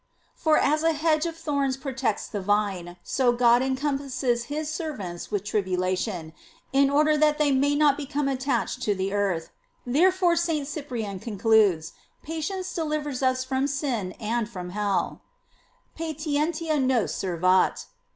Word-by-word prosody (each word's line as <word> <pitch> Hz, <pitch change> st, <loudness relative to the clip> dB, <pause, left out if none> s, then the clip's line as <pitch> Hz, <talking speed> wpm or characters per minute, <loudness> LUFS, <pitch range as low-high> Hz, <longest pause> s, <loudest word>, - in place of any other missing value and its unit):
For 315 Hz, -1 st, +2 dB
as 305 Hz, +2 st, +2 dB
a 325 Hz, 0 st, +3 dB
hedge 310 Hz, +1 st, +1 dB
of 330 Hz, -1 st, -6 dB
thorns 280 Hz, -5 st, -1 dB
protects 265 Hz, -6 st, -2 dB
the 205 Hz, -, -4 dB
vine, 190 Hz, -3 st, -1 dB
so 255 Hz, -3 st, +2 dB
God 240 Hz, 0 st, +4 dB
encompasses 265 Hz, -2 st, -1 dB
his 300 Hz, +3 st, -3 dB
servants 275 Hz, -, -5 dB
with 205 Hz, -2 st, -1 dB
tribulation, 185 Hz, -4 st, -1 dB, 0.4 s
in 275 Hz, 0 st, +4 dB
order 300 Hz, +1 st, +3 dB
thai 305 Hz, 0 st, +5 dB
they 300 Hz, -1 st, +1 dB
may 280 Hz, +2 st, +2 dB
not 290 Hz, -1 st, +4 dB
become 290 Hz, 0 st, -2 dB
attached 265 Hz, -1 st, -1 dB
to 210 Hz, -4 st, +1 dB
the 190 Hz, +1 st, -2 dB
earth; 195 Hz, -5 st, -1 dB, 0.3 s
therefore 350 Hz, +7 st, +3 dB
St. 325 Hz, -4 st, 0 dB
Cyprian 245 Hz, -, -4 dB
concludes, 205 Hz, -6 st, +2 dB, 0.3 s
patience 360 Hz, +4 st, -4 dB
delivers 300 Hz, -4 st, -2 dB
us 255 Hz, -1 st, +2 dB
from 265 Hz, +1 st, 0 dB
sin 260 Hz, -9 st, -2 dB
and 230 Hz, 0 st, -2 dB
from 180 Hz, -5 st, -7 dB
hell: 205 Hz, 0 st, -1 dB, 0.7 s
"Patientia 310 Hz, 0 st, -1 dB
nos 255 Hz, -4 st, +1 dB
servat. 185 Hz, 0 st, +1 dB
265 Hz, 140 wpm, -26 LUFS, 205-300 Hz, 0.7 s, thai